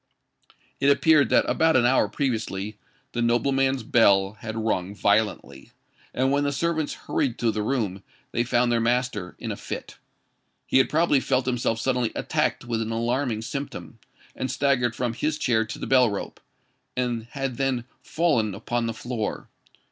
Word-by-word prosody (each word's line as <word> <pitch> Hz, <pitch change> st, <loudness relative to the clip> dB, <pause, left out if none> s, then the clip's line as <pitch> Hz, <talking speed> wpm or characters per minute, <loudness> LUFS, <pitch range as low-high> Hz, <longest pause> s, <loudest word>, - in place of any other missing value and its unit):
It 140 Hz, -, +3 dB
appeared 150 Hz, +1 st, +4 dB
that -, -, +3 dB
about 160 Hz, -1 st, +3 dB
an 120 Hz, -2 st, +4 dB
hour 130 Hz, +2 st, +3 dB
previously 110 Hz, -6 st, -2 dB, 0.4 s
the 120 Hz, -, -2 dB
nobleman's 130 Hz, +2 st, +1 dB
bell 100 Hz, -4 st, +4 dB
had 110 Hz, 0 st, -6 dB
rung 100 Hz, -3 st, -1 dB
violently; 100 Hz, -10 st, 0 dB, 0.4 s
and 130 Hz, +1 st, +1 dB
when 145 Hz, +1 st, +2 dB
the 140 Hz, -, 0 dB
servants 160 Hz, +1 st, -1 dB
hurried 125 Hz, -4 st, 0 dB
to 115 Hz, -2 st, +1 dB
the 105 Hz, 0 st, -2 dB
room, 105 Hz, -5 st, -1 dB, 0.3 s
they 120 Hz, -, +1 dB
found 120 Hz, 0 st, +2 dB
their 120 Hz, -, +2 dB
master 115 Hz, -5 st, -1 dB
in -, -, -5 dB
a -, -, -3 dB
fit. -, -, -7 dB, 0.7 s
He -, -, +3 dB
had 130 Hz, -, +3 dB
probably 155 Hz, -2 st, +3 dB
felt 130 Hz, -1 st, 0 dB
himself 120 Hz, -3 st, 0 dB
suddenly 125 Hz, -1 st, 0 dB
attacked -, -, -1 dB
with 115 Hz, -2 st, -1 dB
an 110 Hz, 0 st, -3 dB
alarming 115 Hz, 0 st, -1 dB
symptom, 140 Hz, +4 st, -6 dB, 0.4 s
and 130 Hz, -, -3 dB
staggered 130 Hz, -5 st, +1 dB
from 120 Hz, -2 st, -1 dB
his 150 Hz, +5 st, -1 dB
chair 115 Hz, -6 st, +1 dB
to 110 Hz, -, -7 dB
the -, -, -5 dB
bell 125 Hz, -3 st, +4 dB
rope, 100 Hz, -, -5 dB, 0.6 s
and 120 Hz, -2 st, -1 dB
had 135 Hz, -3 st, -3 dB
then 130 Hz, -3 st, 0 dB, 0.2 s
fallen 135 Hz, -, +1 dB
upon 120 Hz, -1 st, -2 dB
the 115 Hz, -, -3 dB
floor. 115 Hz, -2 st, -4 dB
120 Hz, 165 wpm, -25 LUFS, 110-135 Hz, 0.7 s, appeared